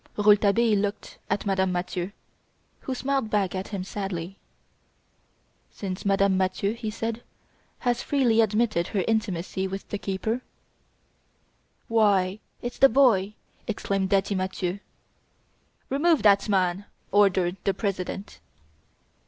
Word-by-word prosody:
Rouletabille 210 Hz, +1 st, +4 dB
looked 205 Hz, +1 st, -4 dB
at 205 Hz, -, -1 dB
Madame 190 Hz, -1 st, +1 dB
Mathieu, 180 Hz, +1 st, -3 dB, 0.7 s
who 260 Hz, -, -4 dB
smiled 265 Hz, -2 st, -1 dB
back 200 Hz, -4 st, 0 dB
at 190 Hz, 0 st, -4 dB
him 195 Hz, -3 st, -4 dB
sadly. 195 Hz, -2 st, -5 dB, 1.3 s
"Since 190 Hz, -1 st, -6 dB
Madame 195 Hz, -1 st, +3 dB
Mathieu," 190 Hz, +2 st, 0 dB
he 230 Hz, -1 st, -5 dB
said, 225 Hz, +2 st, -4 dB, 0.6 s
"has 245 Hz, -1 st, 0 dB
freely 245 Hz, -6 st, +3 dB
admitted 215 Hz, -5 st, +1 dB
her 195 Hz, -3 st, -1 dB
intimacy 190 Hz, -4 st, -1 dB
with 195 Hz, +1 st, -6 dB
the 205 Hz, -, -3 dB
keeper 220 Hz, +6 st, -2 dB, 0.7 s
" -, -, -42 dB, 0.7 s
"Why, 205 Hz, -3 st, +2 dB, 0.2 s
it's 245 Hz, -, -5 dB
the 270 Hz, -, +8 dB
boy!" 215 Hz, -6 st, +3 dB, 0.3 s
exclaimed 195 Hz, -3 st, -1 dB
Daddy 200 Hz, 0 st, +2 dB
Mathieu. 185 Hz, 0 st, -2 dB, 1.1 s
"Remove 305 Hz, +3 st, +2 dB
that 200 Hz, 0 st, +4 dB
man!" 190 Hz, 0 st, +1 dB, 0.3 s
ordered 190 Hz, -2 st, +3 dB
the 195 Hz, -, +1 dB
President. 195 Hz, -1 st, -4 dB
200 Hz, 120 wpm, -26 LUFS, 190-220 Hz, 1.3 s, the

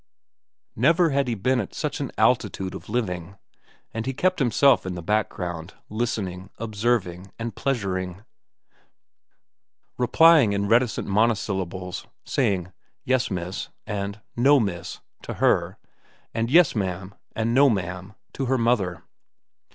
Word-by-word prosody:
Never 165 Hz, -, +4 dB
had 140 Hz, -1 st, +1 dB
he 120 Hz, -, -1 dB
been 125 Hz, +5 st, +1 dB
at -, -, -5 dB
such -, -, -3 dB
an -, -, -3 dB
altitude 95 Hz, -1 st, +1 dB
of -, -, -9 dB
living, 100 Hz, -5 st, -3 dB, 0.6 s
and 115 Hz, +3 st, -4 dB
he 135 Hz, -, -2 dB
kept 185 Hz, +5 st, +1 dB
himself 135 Hz, +1 st, +4 dB
in 95 Hz, -1 st, -4 dB
the 85 Hz, -, -6 dB
background, 90 Hz, -4 st, -2 dB
listening, 100 Hz, -5 st, -3 dB
observing, 105 Hz, -4 st, -1 dB
and 115 Hz, 0 st, -5 dB
pleasuring, 95 Hz, -7 st, -2 dB, 1.8 s
replying 145 Hz, -2 st, +6 dB
in 100 Hz, 0 st, 0 dB
reticent 115 Hz, +2 st, +2 dB
monosyllables, 95 Hz, -4 st, -1 dB, 0.2 s
saying, 90 Hz, -3 st, 0 dB, 0.3 s
"Yes, 130 Hz, -1 st, +1 dB
miss," 90 Hz, -1 st, -4 dB, 0.2 s
and 100 Hz, 0 st, -4 dB, 0.2 s
"No, 140 Hz, +4 st, +5 dB
miss," 100 Hz, -7 st, -3 dB, 0.2 s
to -, -, -6 dB
her, -, -, +2 dB, 0.6 s
and 115 Hz, 0 st, -1 dB
"Yes, 165 Hz, 0 st, +5 dB
ma'am," 95 Hz, -1 st, -3 dB, 0.2 s
and 115 Hz, +1 st, 0 dB
"No, 140 Hz, +2 st, +6 dB
ma'am," 95 Hz, -1 st, -3 dB, 0.2 s
to 135 Hz, -, -2 dB
her 130 Hz, +1 st, +2 dB
mother. 115 Hz, -7 st, 0 dB
105 Hz, 130 wpm, -24 LUFS, 95-125 Hz, 1.8 s, replying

